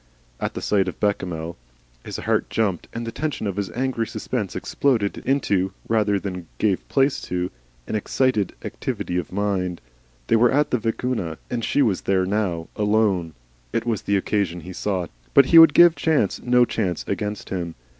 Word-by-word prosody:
At - - -3
the - - -5
sight 100 -2 +2
of 90 - -5
Bechamel, 85 -5 -2 0.5
his - - -6
heart - - 0
jumped, 100 -7 -1
and 115 0 -5
the 115 - -4
tension 150 -2 -3
of 100 -2 -2
his 100 -1 -2
angry 125 -3 -1
suspense 110 -2 -3
exploded 115 -8 0
into, 100 -9 +1
rather 105 -3 +2
than 90 -3 -6
gave 100 -4 0
place 135 0 +2
to, 90 0 -2 0.3
an - - -6
excited 110 -1 0
activity 90 - -3
of 85 - -6
mind. 95 -3 -1 0.5
They 115 - +3
were 120 +2 +5
at 145 +2 +2
the 125 - +2
Vicuna, 115 -7 -2
and 120 -2 -2
she 145 - +2
was 100 -5 +1
there 95 -1 +1
now 95 -5 -1
alone. 105 -6 +1 0.4
It 115 - -1
was 115 -4 -1
the 100 - +1
occasion 95 -3 -1
he 90 +3 -8
sought. 95 -2 -2 0.2
But 140 - +8
he 165 - +11
would 165 -3 +8
give 175 -1 +8
Chance 155 - +1
no 125 0 +4
chance 95 -8 -2
against 105 +2 -3
him. 85 -3 -3
105 Hz, 175 wpm, -23 LUFS, 95-120 Hz, 0.5 s, he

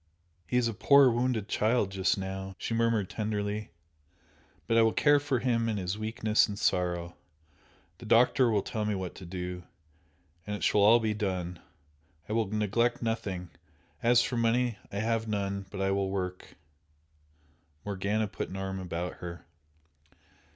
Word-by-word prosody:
"He 125 - 0
is 125 -2 +3
a 115 - -2
poor 140 +4 +6
wounded 120 -3 0
child 110 -1 +1
just 95 0 +1
now!" 95 0 -5
she - - -4
murmured, 115 -3 +1
tenderly 105 0 -3 1.0
"But 115 - +1
I 115 - +6
will 110 -1 +3
care 145 -1 +4
for 140 -2 0
him 115 -2 +1
in 110 - -1
his 95 0 -2
weakness 110 0 +1
and 100 -2 -6
sorrow! 90 -2 0 0.8
The - - -10
doctor 125 +1 +4
will 105 -3 +1
tell 110 - -3
me 105 -1 0
what 95 -4 -4
to 90 - -11
do 90 0 -5 0.9
and 105 - -2
it - - -6
shall 105 - +3
all 110 +4 +7
be 110 -2 0
done! 90 -5 -3 0.7
I 105 - -3
will 110 -2 +1
neglect 110 +4 0
nothing 95 -6 -3 0.5
as 120 0 +5
for 125 0 -2
money, 115 -1 +1
I 100 - -5
have 115 0 0
none 100 -2 -2
but 95 - -7
I 95 0 +1
will 100 0 0
work 90 -1 -4 0.7
" 75 0 -37
Morgana 105 +2 -1
put - - -5
an 95 - -6
arm 95 0 -4
about 90 -1 -4
her. 85 -1 -8
105 Hz, 165 wpm, -29 LUFS, 95-115 Hz, 1.0 s, all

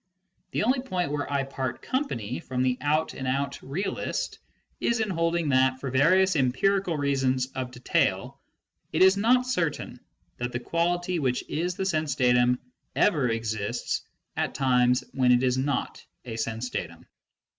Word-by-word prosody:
The - - -1
only 255 +4 +2
point 185 - -2
where 145 -1 -3
I 140 -1 +1
part 130 -2 -4
company 125 - -2
from 130 0 -2
the 130 -1 +2
out 155 +2 +1
and 130 - -5
out 140 +1 -1
realist 180 +9 -3 0.4
is 235 -1 +1
in 215 -2 0
holding 165 -1 0
that, 130 -1 +3
for 135 -1 -4
various 185 +8 +4
empirical 165 +7 +1
reasons 135 -3 +1
of 130 -1 -3
detail, 125 0 -1 0.5
it - - +4
is 190 +1 +7
not 245 +5 +3
certain 165 - -2 0.4
that 120 0 -3
the 120 - -1
quality 175 +5 0
which 130 -4 0
is 175 +3 -2
the 190 - -2
sense 155 -6 0
datum 125 -1 +3 0.4
ever 150 - +3
exists 110 -3 -2 0.3
at - - -2
times 125 -2 +3
when 125 -2 +3
it 125 +1 +4
is 130 0 +2
not 135 -1 -2 0.2
a 115 -2 -5
sense 115 +2 -3
datum. - - -5
140 Hz, 155 wpm, -27 LUFS, 125-175 Hz, 0.5 s, is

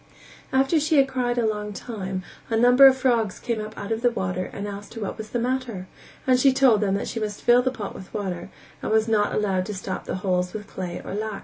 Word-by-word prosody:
After 270 +4 +3
she 310 +1 +2
had 270 -1 +5
cried 250 -2 -1
a 235 - +2
long 210 -1 -2
time, 190 -4 -5 0.3
a 225 - +1
number 250 +4 +8
of 265 0 +5
frogs 235 -6 +1
came 235 -3 -2
up 215 +1 -8
out 200 +2 -6
of 225 0 -1
the 245 - +4
water 185 -5 -2
and 200 +1 -5
asked 205 +2 -8
her 225 - -6
what 200 - -3
was 215 -1 -8
the - - -2
matter, 240 -6 -2 0.4
and 255 -1 +4
she 270 +1 +5
told 260 -5 +4
them 195 -2 +1
that 200 - -2
she 230 - -3
must 210 -1 -4
fill 240 +1 +6
the 260 - +1
pot 220 -6 -6
with 190 - -11
water, 185 -4 -4 0.3
and - - -3
was 220 0 +3
not 210 -2 +2
allowed 190 -3 0
to 210 - -4
stop 190 - -5
the - - -3
holes 180 -1 0
with 210 -1 -6
clay 180 -3 -6
or - - -5
lac. 215 0 -3
215 Hz, 250 wpm, -24 LUFS, 200-245 Hz, 0.4 s, number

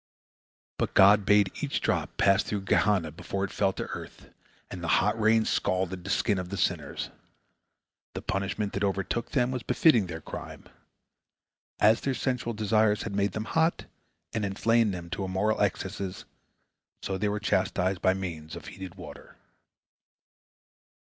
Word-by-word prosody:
But - - -1
God 100 +1 +6
bade 105 -2 +5
each 145 -2 -1
drop - - -1
pass 100 -1 +4
through 105 -2 -3
Gehenna 95 -4 +2
before 95 +5 -4
it 100 - -3
fell 95 - +1
to - - -4
earth, - - -9 0.4
and 90 - -7
the - - -2
hot 105 +3 +1
rain 110 +1 +4
scalded 95 -1 -1
the 100 - -7
skin 100 0 +1
of 90 -1 -5
the 100 - -4
sinners. 85 -5 -2 1.0
The - - -5
punishment 100 +1 -2
that 100 - -2
overtook 100 +4 -1
them 125 -2 +2
was 130 -2 -3
befitting 115 - +3
their 80 -2 -6
crime. - - -8 1.1
As 110 +2 +5
their 135 -1 -1
sensual 125 -3 -2
desires 105 0 +2
had 110 - -5
made 100 -1 +1
them 110 +1 -3
hot, 160 +9 +1 0.5
and 110 - -1
inflamed 110 +3 +2
them 85 -2 -7
to 90 +3 -3
immoral 95 +3 0
excesses, 95 -1 -2 0.8
so 95 -1 -2
they 105 +1 +1
were 105 +1 -2
chastised 95 -2 0
by 95 - +3
means 80 -5 -6
of - - -9
heated 95 -1 -9
water. 90 - -12
100 Hz, 155 wpm, -28 LUFS, 95-110 Hz, 1.1 s, God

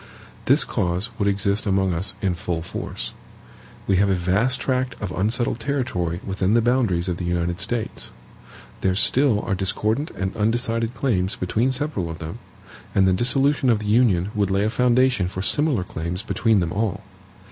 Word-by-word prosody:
This - - +4
cause 90 +6 -1
would 100 - +1
exist 100 +1 +1
among 95 -2 +2
us 95 +4 -2
in 95 -2 +2
full 85 -1 -3
force. - - -5 0.7
We 95 - +2
have 100 +1 +3
a 95 - +3
vast 100 +9 +1
tract 130 -1 -1
of 100 -4 -4
unsettled 115 +5 +1
territory 115 -10 -2
within 95 +2 0
the 120 - +5
boundaries 115 -8 +1
of 90 -2 -1
the 90 - -5
United 85 0 -1
States. 115 +2 -3 0.7
There 95 -1 +1
still 125 +1 +3
are 110 - -2
discordant 110 - 0
and 95 0 -2
undecided 115 +1 0
claims 105 -7 0
between 110 +8 0
several 130 - -3
of 80 - -6
them, 80 0 -7 0.6
and 95 -1 +4
the 95 - +4
dissolution 135 +6 +2
of 115 - +4
the 105 - -6
Union 105 -4 +3
would 100 -2 0
lay 95 +1 +1
a 110 - 0
foundation 125 -4 +3
for 95 +1 -4
similar 145 - +2
claims 85 +3 -4
between 110 -4 +2
them 85 -1 -2
all. 105 -2 -1
100 Hz, 175 wpm, -23 LUFS, 90-120 Hz, 0.7 s, the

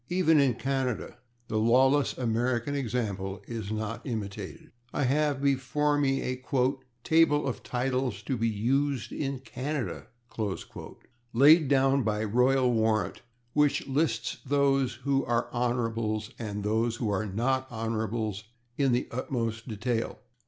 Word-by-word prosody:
Even 165 -4 +4
in 135 -4 +3
Canada 130 -2 -2 0.3
the 110 - 0
lawless 130 +5 +3
American 120 +2 0
example 105 -8 -2
is 110 -3 -5
not 110 +1 -3
imitated. 105 -5 -6 0.2
I 145 - -1
have 140 +1 +1
before 140 +2 +1
me 135 -1 +1
a 130 0 -4 0.6
"Table 160 -2 +4
of 130 - -3
Titles 125 -4 -2
to 130 - -1
be 115 -1 +1
Used 130 +5 0
in 135 -2 -3
Canada," 135 0 -4 1.3
laid 150 +5 +7
down 135 0 +3
by 105 -2 0
royal 125 +3 +3
warrant, 110 -1 +1 0.3
which 150 -1 +2
lists 145 +4 0
those 135 -2 +2
who 140 -1 +2
are 120 -1 0
/Hons./ 115 -2 -1
and 105 -3 -4
those 110 +2 +1
who 115 -3 -2
are 100 +2 -1
not 130 +6 0
/Hons./ 110 -2 -2 0.4
in 135 -3 +3
the 125 - 0
utmost 115 -2 -3
detail. 115 +1 -2
125 Hz, 130 wpm, -28 LUFS, 110-135 Hz, 1.3 s, laid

